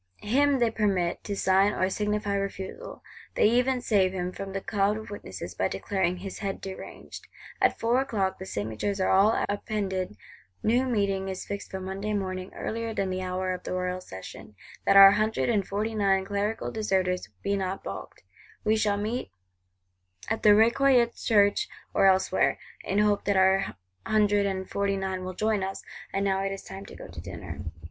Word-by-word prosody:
Him 275 +6 +3
they 235 -3 +2
permit 195 -6 0
to 200 - -2
sign 195 +1 +3
or 185 - +1
signify 210 0 -1
refusal; 200 - -5 0.3
they - - +4
even 250 +3 +3
save 195 -6 +2
him 180 -1 -2
from 195 +1 -6
the 195 - -2
cloud 200 +1 0
of 220 -1 -8
witnesses, 95 - -7
by 95 +2 0
declaring 180 - -1
"his 190 +1 -7
head 195 -2 -3
deranged." 190 -1 -9 0.3
At - - +3
four 235 +3 +2
o'clock, 195 -8 -1
the 190 - -7
signatures 110 - -3
are 190 - +2
all 200 +4 +4
appended; 195 - -2 0.5
new 245 +4 +3
meeting 200 -5 0
is 190 -1 -5
fixed 200 - -5
for 190 - -5
Monday 195 +3 -4
morning, 185 -2 -3
earlier 225 0 -3
than 190 -1 -1
the 185 0 -2
hour 185 0 -2
of 180 - -6
the - - -5
Royal 180 0 -2
Session; 100 - -10 0.3
that 195 - +6
our 195 0 +11
Hundred 215 +3 +1
and 205 -5 +1
Forty 215 +3 -2
nine 195 -2 +2
Clerical 205 +2 -2
deserters 190 -4 0
be 200 0 +1
not 190 0 -3
balked: - - -8 0.4
we 215 0 +3
shall 210 -2 +1
meet 220 +5 -3 1.0
"at 225 - 0
the 210 -1 +7
Recollets 235 +2 +4
Church 210 - +3 0.2
or 195 - +5
elsewhere," 190 0 +3 0.3
in 195 - -1
hope 210 -1 +2
that 200 -1 +2
our 190 +1 +3 0.3
Hundred 205 -2 +3
and 190 -1 -3
Forty 200 0 0
nine 190 -1 -3
will 185 0 -5
join 215 0 +1
us;—and 195 +1 -5
now 195 0 +1
it 195 - -1
is 195 - -6
time 195 +1 -9
to - - -11
go - - -9
to - - -9
dinner. - - -8
195 Hz, 180 wpm, -27 LUFS, 190-215 Hz, 1.0 s, our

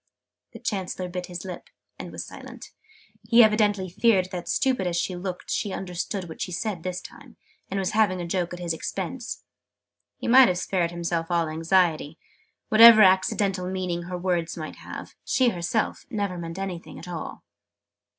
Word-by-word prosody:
The - - -9
Chancellor 185 -2 -3
bit 180 0 -5
his 175 0 -7
lip, 180 -2 -8 0.3
and - - -7
was - - -6
silent. - - -11 0.6
He 235 0 +8
evidently 210 -3 +2
feared 185 0 +2
that, 175 -2 -5
stupid 255 -9 +1
as 170 -1 -1
she 180 +1 -1
looked, 180 0 -5
she 205 - -1
understood 185 0 -4
what 160 - -9
she 180 - -3
said 190 0 -3
this 180 +1 -4
time, - - -13 0.3
and 195 - -2
was 190 -1 -1
having 210 -4 +2
a 175 - -3
joke 175 0 -1
at 175 - -7
his 170 -2 -2
expense. 195 +9 -5 0.7
He - - -5
might 255 +1 +8
have 180 - 0
spared 180 -1 0
himself 170 -1 -2
all 170 -2 +1
anxiety: 165 -1 +1 0.5
whatever 220 0 +10
accidental 190 0 +2
meaning 185 -2 -2
her 180 0 -4
words 175 -2 -1
might 155 -1 -6
have, - - -9
she 255 -2 +3
herself 180 +3 -2
never 205 -6 -2
meant 165 0 -6
anything 190 -3 -6
at - - -10
all. 170 -3 -6
185 Hz, 170 wpm, -25 LUFS, 175-200 Hz, 0.7 s, whatever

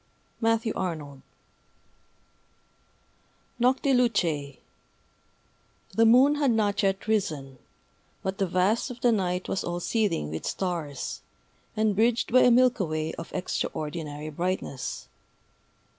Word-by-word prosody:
MATTHEW 225 0 +1
ARNOLD 150 -7 -4 2.4
Noctilucæ 235 - +1
[Decoration] - - -29 1.3
THE 225 +3 +4
moon 260 +6 +6
had 285 -2 +2
not 210 -3 +1
yet 195 +1 0
risen; 155 - -1 0.6
but 190 +1 -3
the 195 - +1
vast 185 +8 +1
of 245 -1 -9
the 245 - +4
night 185 -4 -1
was 195 - -2
all 175 0 -3
seething 185 - 0
with 80 - -5
stars, 165 -7 -3 0.6
and 215 -2 +2
bridged 230 +2 +1
by 255 - +7
a - - +6
Milky 245 -3 +4
Way 155 0 -3
of 165 - -8
extraordinary 155 -3 -4
brightness. 170 -5 -3
190 Hz, 115 wpm, -27 LUFS, 155-230 Hz, 2.4 s, by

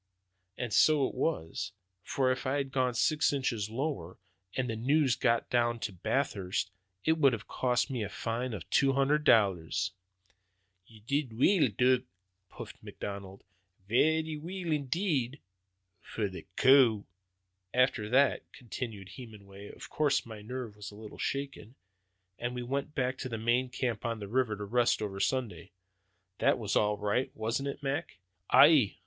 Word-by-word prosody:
And 120 -4 -4
so 150 -4 +5
it - - -7
was; 95 - -2 0.3
for 130 +5 0
if 130 +1 -3
it - - +1
had 135 0 -1
gone 130 -3 0
six 155 +6 +2
inches 120 -7 -1
lower, 110 - -4 0.4
and 130 -1 0
the 115 - -2
news 135 +2 +2
gotten 115 +1 +1
out 120 -1 +1
at 90 -3 -16
Bathurst, 95 -8 -1 0.3
it 160 0 +2
would 135 -4 +5
have 115 -1 -5
cost 125 +2 0
me 125 -3 -2
a 100 - -3
fine 115 +1 -3
of 85 - -8
two 135 -1 +4
hundred 140 +3 +2
dollars." 95 - +3 1.0
"Ye 110 -2 -17
did 130 0 -2
weel, 165 - +4
Dud," 125 +4 +2 0.4
puffed - - -10
McLeod; 100 -1 -7 0.5
"varra 155 +6 +2
weel 175 0 -4
indeed 145 - -1 0.6
for 105 0 -3
the 95 -1 -9
coo!" 125 -6 +5 0.7
"After 125 -4 +2
that," 135 +4 +2
continued 110 -5 -7
Hemenway, 100 -5 -11
"of - - -11
course 145 -2 +1
my 110 -2 -9
nerve 120 -1 -6
was 105 -1 -8
a 105 - -13
little 110 0 -11
shaken, 135 -4 -4 0.6
and 120 +1 -3
we 125 - -3
went 140 +4 -3
back 130 -1 -1
to 130 - -4
the 115 - -3
main 120 +3 +1
camp 125 -4 -2
on 115 -1 -2
the 105 -2 -7
river, 115 -1 0
to 105 - -5
rest 120 +4 +2
over 95 -2 -4
Sunday. 110 -9 -2 0.7
That - - +3
was - - -2
all 105 0 +2
right, 105 +5 0
wasn't 115 +5 -2
it, 140 - -7
Mac!" 140 -3 -3 0.3
"Aye!" 140 -10 +6
125 Hz, 160 wpm, -30 LUFS, 105-135 Hz, 1.0 s, Aye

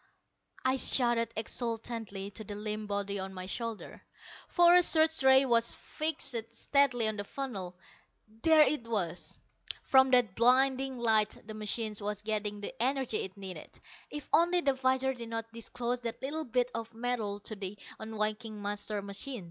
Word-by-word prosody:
I 260 +1 +3
shouted 240 -3 +4
exultantly 225 -3 -3
to 220 - -8
the 205 0 -7
limp 210 0 -4
body 200 -1 -2
on 190 0 -6
my 185 0 -5
shoulder. 230 +2 -5 0.5
For 345 -1 +5
a 360 - +8
search 320 -2 +3
ray 265 0 +6
was 235 -2 +2
fixed 285 -7 -2
steadily 260 -5 +3
on 215 -1 -1
the 205 - -3
funnel. 200 -7 -5 0.7
There 315 +1 +7
it 260 -4 -1
was. 185 -7 -2 0.5
From 265 0 +5
that 245 -6 +4
blinding 260 +2 +3
light 220 -3 +2
the 215 - -8
machine 215 +1 -3
was 210 0 -4
getting 210 -1 -2
the - - -5
energy 260 -2 0
it 190 +1 -5
needed. 190 -2 -9 0.3
If 295 -2 -7
only 350 +2 +4
the 275 -4 +2
visor 260 0 +1
did 235 -2 -8
not 225 0 -5
disclose 240 +2 -3
that 230 -1 -5
little 310 +4 -3
bit 250 +1 0
of 230 0 -6
metal 225 -4 -2
to 215 - -6
the 200 0 -6 0.2
unwinking 215 0 -3
master 205 0 -3
machine! 200 +6 -3
230 Hz, 160 wpm, -31 LUFS, 210-265 Hz, 0.7 s, a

